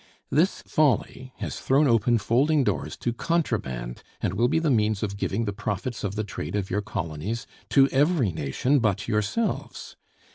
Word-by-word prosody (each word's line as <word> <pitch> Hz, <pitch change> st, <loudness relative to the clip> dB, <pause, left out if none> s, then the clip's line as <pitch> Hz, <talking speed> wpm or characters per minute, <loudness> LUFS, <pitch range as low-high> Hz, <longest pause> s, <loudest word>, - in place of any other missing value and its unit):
This 165 Hz, +8 st, +2 dB
folly 130 Hz, -3 st, +1 dB
has -, -, -5 dB
thrown 140 Hz, +3 st, +3 dB
open 115 Hz, 0 st, +3 dB
folding 140 Hz, +7 st, +2 dB
doors -, -, -2 dB
to 120 Hz, -, -2 dB
contraband, 85 Hz, -, -2 dB, 0.2 s
and -, -, -1 dB
will 115 Hz, +5 st, +2 dB
be 160 Hz, +6 st, +1 dB
the 160 Hz, -2 st, +2 dB
means 110 Hz, -3 st, +1 dB
of 100 Hz, -2 st, -2 dB
giving 100 Hz, +2 st, -1 dB
the 100 Hz, -, -2 dB
profits 105 Hz, +3 st, -4 dB
of 100 Hz, 0 st, -2 dB
the 110 Hz, -, -1 dB
trade 100 Hz, -4 st, -5 dB
of 100 Hz, -2 st, -2 dB
your 105 Hz, -, +1 dB
colonies 90 Hz, +4 st, -4 dB, 0.2 s
to 135 Hz, -1 st, +6 dB
every 140 Hz, -, +2 dB
nation 80 Hz, -, +1 dB
but 105 Hz, -5 st, 0 dB
yourselves. 110 Hz, -, -2 dB
115 Hz, 170 wpm, -26 LUFS, 100-135 Hz, 0.2 s, to